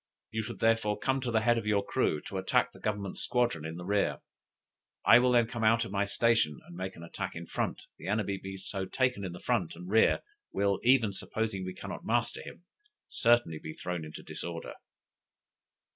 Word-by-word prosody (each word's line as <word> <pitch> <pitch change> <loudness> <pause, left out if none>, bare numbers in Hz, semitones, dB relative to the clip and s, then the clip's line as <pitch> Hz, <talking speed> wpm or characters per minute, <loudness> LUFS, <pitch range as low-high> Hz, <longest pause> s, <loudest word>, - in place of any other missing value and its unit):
You 110 - -1
should 110 - -6
therefore 115 -2 +2
come 135 0 +1
at 130 -3 -2
the 110 -1 +3
head 120 +1 +3
of 110 - -6
your 100 -1 +2
crew, 75 - +1
to 95 - -5
attack 95 - +2
the - - -15
Government 100 -3 -3
squadron 120 -10 +1
in 80 +1 -5
the 90 - -7
rear. 100 +1 +1 0.9
I 115 - +9
will 125 0 +3
then 120 -1 +5
come 115 0 -4
out 115 +1 +4
of - - -8
my 100 0 +1
station 105 - +2
and 85 - -12
make 95 +1 -4
an 85 - -10
attack 85 - -5
in - - -6
front; - - -2 0.2
the - - -8
enemy 100 -1 0
being 95 0 -7
so 95 0 -4
taken 125 -2 0
in 95 - -3
the 90 - -8
front 110 -10 0
and 90 +1 -9
rear, 110 +3 +4 0.3
will, 100 -1 +1
even 120 -5 +4
supposing 110 -1 -2
we 95 - -5
cannot - - -7
master - - 0
him, - - -11 0.5
certainly 115 -10 +3
be 80 0 -7
thrown 90 -1 -4
into 75 0 -9
disorder." 85 -1 -5
100 Hz, 205 wpm, -31 LUFS, 95-115 Hz, 0.9 s, I